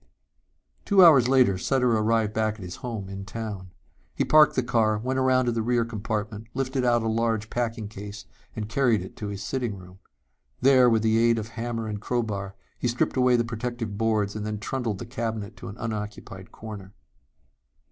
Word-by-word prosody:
Two 195 -3 +6
hours 140 -7 +7
later 125 -8 +4
Sutter 125 +3 +1
arrived 110 0 +1
back 110 -1 0
at 110 - -13
his 90 - -7
home 115 -6 -5
in 95 0 -7
town. 100 -2 -6 0.5
He - - +1
parked 155 -1 +6
the 130 - +1
car, 115 -3 +2
went 130 +4 -2
around 130 -1 +3
to 120 - +1
the 115 -1 -1
rear 120 0 +1
compartment, 110 -1 -4
lifted 130 -1 -1
out 120 -2 +3
a - - -1
large 110 -1 0
packing 115 -3 -2
case 105 -1 -9 0.3
and 105 -1 -4
carried 115 -4 +2
it 95 - -11
to 105 - -5
his 100 -1 -5
sitting 120 -6 -3
room. 90 0 -14 0.6
There, 130 -1 +6
with 110 -1 +2
the 110 0 +3
aid 115 0 +4
of 110 0 -4
hammer 115 -1 -4
and 105 -1 -4
crowbar, 105 -5 -2 0.2
he - - 0
stripped 120 0 0
away 125 -1 +4
the 120 -1 +2
protective 115 -2 -4
boards 110 -3 +1
and 105 - -4
then 105 0 -3
trundled 115 0 -3
the 120 - -7
cabinet 115 -3 -4
to - - -9
an 100 - -8
unoccupied 105 -4 -6
corner. 100 -3 -9
115 Hz, 190 wpm, -26 LUFS, 105-120 Hz, 0.6 s, hours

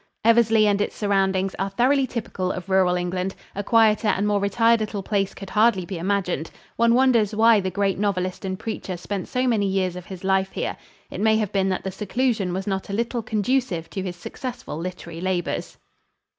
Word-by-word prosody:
Eversley 225 -1 +5
and 205 -1 +2
its - - -2
surroundings 195 -2 +1
are 195 +1 0
thoroughly 260 +6 +2
typical 195 -6 -3
of 185 +1 -6
rural 190 -2 +3
England. 180 +1 -2 0.2
A 200 - -3
quieter 220 0 +4
and 200 0 +1
more 205 -1 +2
retired 230 +3 +3
little 210 -2 -3
place 195 -1 -1
could 195 -1 -9
hardly 210 -4 +3
be 185 -2 -5
imagined. 180 -4 -1 0.3
One 235 0 +4
wonders 235 -5 +3
why 225 0 +6
the 190 -1 -2
great 195 0 0
novelist 185 -3 -1
and 190 -1 -3
preacher 195 -4 -5
spent 190 +2 -4
so 255 0 -1
many 215 -5 +2
years 190 -2 0
of 180 -1 -8
his 190 -2 -9
life 190 0 +1
here. - - -2 0.4
It - - -5
may 220 0 +4
have 215 -3 -1
been 195 -1 +1
that 185 - -2
the 190 - -3
seclusion 210 0 -1
was 190 +2 -3
not 195 -1 -3
a - - -4
little 235 +2 -1
conducive 215 -5 -1
to 195 - -3
his 185 -2 -4
successful 250 - -7
literary 170 -1 -6
labors. 185 -2 -2
200 Hz, 200 wpm, -23 LUFS, 185-220 Hz, 0.4 s, why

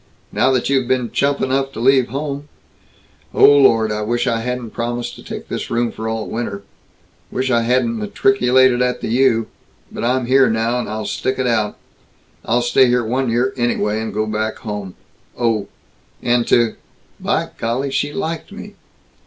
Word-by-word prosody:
Now 130 - +2
that 125 - 0
you've 135 -3 +1
been 125 -2 0
chump 140 0 +1
enough 135 +1 0
to - - -7
leave 130 +1 +4
home 140 +2 -5 0.9
Oh - - +7
Lord, 125 -6 +5
I 105 0 -2
wish 120 +3 -1
I 115 -3 0
hadn't 125 -1 -4
promised 120 +1 -3
to - - -13
take - - -7
this - - -4
room 120 0 0
for 110 0 -5
all 110 -1 -3
winter. 100 -4 -4 0.7
Wish 130 +1 -1
I 120 -1 +3
hadn't 130 - +1
matriculated 130 -12 +3
at 125 0 0
the - - -3
U. 115 -2 +3 0.5
But - - -6
I'm 125 +1 +1
here 130 +1 +4
now, 115 +2 0
and - - -4
I'll 110 0 -4
stick 130 - -2
it 130 - -1
out. 110 -4 0 0.7
I'll 120 +2 +1
stay 125 +2 +4
here 120 -1 +1
one 130 +2 0
year 125 +3 +1
anyway, 110 -3 0
and 110 -1 -4
go 110 +2 -1
back 110 0 -2
home. 105 -5 -6 0.4
Oh! 115 -4 0 0.6
And 120 0 +2
to 120 -2 +3 0.4
By - - -1
Golly! 125 +4 -1
She 145 +2 -1
liked 165 -2 -4
me!" - - -9
120 Hz, 180 wpm, -19 LUFS, 115-130 Hz, 0.9 s, Oh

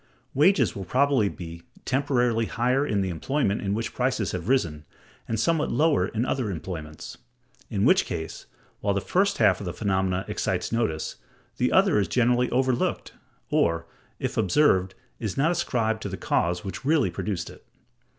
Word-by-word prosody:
Wages 185 +9 +3
will 100 - -4
probably 130 0 +2
be 85 -2 -8 0.2
temporarily 125 -4 +1
higher 125 +3 +1
in 100 -2 +1
the 95 - -1
employment 105 - -1
in 100 0 -1
which 115 +1 -3
prices 125 -5 0
have 90 +4 -4
risen, 80 - +1 0.4
and 115 - -1
somewhat 165 +4 +1
lower 150 - +3
in 115 +3 -2
other 130 -5 -1
employments: 80 -4 -7 0.5
in - - 0
which - - +5
case, 80 0 -6 0.3
while 100 -1 0
the - - +2
first 195 - +1
half 100 -5 +4
of 100 - -6
the 90 - -3
phenomenon 95 -2 0
excites - - -2
notice, 110 -10 -1 0.4
the - - +1
other - - +4
is 100 - +1
generally 125 +3 +2
overlooked, 130 -1 0 0.4
or, 85 0 +2 0.3
if - - -3
observed, 95 - +3 0.2
is 110 -4 -4
not 150 +5 +3
ascribed 110 -9 0
to 100 - -4
the 95 - -5
cause 90 -1 0
which 95 +5 -6
really 150 0 +2
produced 95 -5 -3
it. - - -16
110 Hz, 165 wpm, -26 LUFS, 95-130 Hz, 0.5 s, which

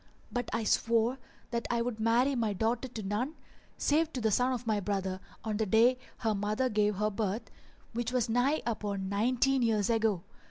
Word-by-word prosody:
But 245 -1 -2
I 225 +1 -1
swore 230 +3 +2 0.3
that 235 -1 -2
I 235 -1 +1
would 235 -2 -3
marry 235 +5 +3
my 225 -5 0
daughter 230 +6 0
to 225 -3 -7
none 225 +10 -2 0.4
save 315 +2 +2
to 255 - -2
the 220 -2 +1
son 250 +5 +3
of 250 -1 -3
my 215 -2 +1
brother 190 -2 -2 0.2
on 215 -2 -2
the 220 -1 0
day 235 +5 +4 0.2
her 220 -3 0
mother 210 +5 0
gave 210 -1 +2
her 210 +2 0
birth, 210 +1 -2 0.4
which 240 +1 -2
was 250 -3 +1
nigh 245 +6 +2
upon 205 -4 -2
nineteen 250 +6 +2
years 220 -2 +2
ago. 220 -6 +1
225 Hz, 190 wpm, -31 LUFS, 210-245 Hz, 0.4 s, day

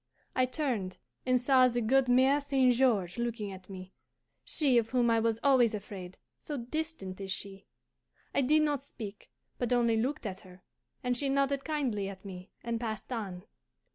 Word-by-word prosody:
I 255 0 +3
turned 245 -9 -2 0.3
and 255 0 +4
saw 255 0 +5
the 245 -1 0
good 255 +3 +3
Mere 260 +3 +4
St. 270 -3 +3
George 225 -7 +2
looking 230 -4 -2
at 185 0 -11
me, 185 -1 -9 0.5
she 270 -6 +3
of 225 -1 -3
whom 245 -2 +2
I 230 - +4
was 225 0 +1
always 255 -6 +4
afraid, 190 -3 -8 0.2
so 295 - -5
distant 250 - -4
is 195 - -5
she. 195 0 -5 0.7
I - - +3
did 305 +4 +4
not 290 -3 0
speak, 215 -7 -9 0.3
but 245 -1 -1
only 235 -2 +3
looked 250 +3 -1
at 190 -3 -4
her, 185 -3 -16 0.4
and 250 0 +1
she 275 +3 0
nodded 275 0 +1
kindly 255 -11 -1
at 190 0 -11
me 185 0 -8
and 230 -1 -2
passed 220 +1 -4
on. 190 -6 -5
235 Hz, 175 wpm, -31 LUFS, 200-265 Hz, 0.7 s, saw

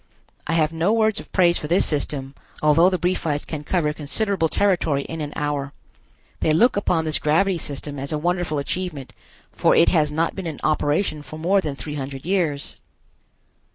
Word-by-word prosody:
I 165 - 0
have 160 -1 +2
no 165 +5 +1
words 220 -1 +2
of - - -12
praise 175 -2 +3
for 150 - -5
this 175 +5 +3
system, 140 -2 -2 0.3
although 165 +4 +5
the 185 - 0
Briefites 165 -5 -1
can 150 -2 -6
cover 150 -2 0
considerable 165 +3 0
territory 170 -9 +1
in 165 +2 -6
an 145 -1 -4
hour. 145 -1 -2 0.7
They - - +1
look 200 +11 +4
upon 175 -5 0
this 155 -1 +3
gravity 175 +4 +2
system 145 -1 -4
as 140 +1 -4
a 155 - 0
wonderful 175 -1 -1
achievement, 150 -1 -4 0.4
for - - +2
it - - +5
has 150 -4 +2
not 160 +2 0
been 190 -3 -5
in 155 -3 -5
operation 155 +1 0
for 155 +1 -10
more 190 +5 +2
than 150 -5 -4
three 135 +3 -6
hundred 135 -1 -6
years. 165 -7 -1
155 Hz, 185 wpm, -22 LUFS, 145-180 Hz, 0.7 s, although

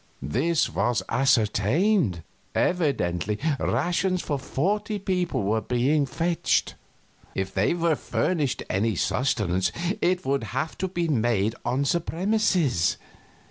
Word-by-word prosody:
This 150 - +1
was 120 -1 0
ascertained. 125 - +2 0.3
Evidently 105 - 0 0.2
rations 175 +8 0
for 145 -2 -2
forty 205 +11 -1
people 180 - -1
were 105 +3 +1
not 110 - -5
being 135 +4 +2
fetched. 170 +4 0 0.6
If 95 0 -2
they 100 - +2
were 170 -2 +2
furnished 150 -3 -1
any 105 +3 0
sustenance 95 -5 0 0.3
it 180 -2 +1
would 135 -3 0
have 155 +4 -2
to 190 - 0
be 175 -2 -2
made 115 -6 +1
on 135 +3 0
the 155 +5 +2
premises. 170 - +1
140 Hz, 120 wpm, -25 LUFS, 110-175 Hz, 0.6 s, ascertained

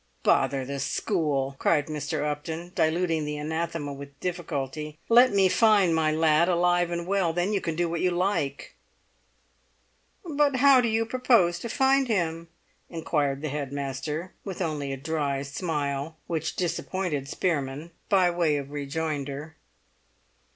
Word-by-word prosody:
"Bother 135 -2 +2
the 140 +1 -4
school!" 140 -3 -1
cried 150 -4 +2
Mr. 150 -1 -3
Upton, 160 +4 -4
diluting 160 0 +1
the 150 0 -3
anathema 160 -1 -3
with 140 0 -11
difficulty. 155 -4 -4
"Let 245 +2 +7
me 195 -1 +4
find 205 -3 +4
my 160 -1 +2
lad 160 +2 +3
alive 175 0 +2
and 170 0 -3
well; 190 -3 +1
then 175 +5 0
you 200 - +1
can 165 -2 -2
do 175 +1 +1
what 170 0 -2
you 185 - +3
like." 175 -6 -1 1.5
"But 295 -4 +2
how 265 0 +6
do 240 - +1
you 225 0 +1
propose 225 -8 +3
to 235 - -5
find 270 +2 +3
him?" 170 -6 -1 0.4
inquired 150 -4 -1
the 155 - -1
head 140 -1 -4
master, 140 +5 -4
with 195 -3 -6
only 150 -6 -2
a 135 - -3
dry 140 -1 -2
smile 145 0 -3
(which 160 -2 -3
disappointed 175 -4 -2
Spearman) 150 -1 -2 0.2
by 185 -3 +4
way 170 -4 +1
of 140 0 -6
rejoinder. 145 0 -4
160 Hz, 145 wpm, -26 LUFS, 145-180 Hz, 1.5 s, Let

